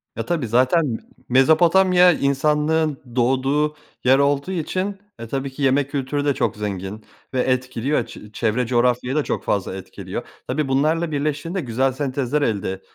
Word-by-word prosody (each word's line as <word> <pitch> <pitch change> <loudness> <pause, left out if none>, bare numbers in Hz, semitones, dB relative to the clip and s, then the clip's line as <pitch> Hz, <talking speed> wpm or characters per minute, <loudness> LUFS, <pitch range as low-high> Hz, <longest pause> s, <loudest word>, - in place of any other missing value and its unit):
Ya, - - -4
tabii 160 -9 -1
zaten 130 +2 +2 0.3
Mezopotamya, 175 +7 +5
insanlığın 150 +1 +1 0.2
doğduğu 135 +5 +1 0.3
yer 130 +2 +5
olduğu 140 +4 +1
için 185 +3 -2 0.2
e, 115 - -7
tabii 135 +3 -3
ki 140 - -9
yemek 135 +1 +2
kültürü 145 +1 -2
de 145 - +3
çok - - -1
zengin 100 0 -5 0.3
ve 130 - 0
etkiliyor, 130 0 0
çe 105 - -12
çevre 115 +3 0
coğrafyayı 125 +1 +1
da 150 - +2
çok - - -3
fazla 95 -2 -1
etkiliyor. 95 - -7 0.2
Tabii 140 +2 -1
bunlarla 155 +5 +1
birleştiğinde 150 +5 -2
güzel 130 +1 0
sentezler 135 +1 -1
elde 100 -6 -1
135 Hz, 150 wpm, -21 LUFS, 125-150 Hz, 0.3 s, Mezopotamya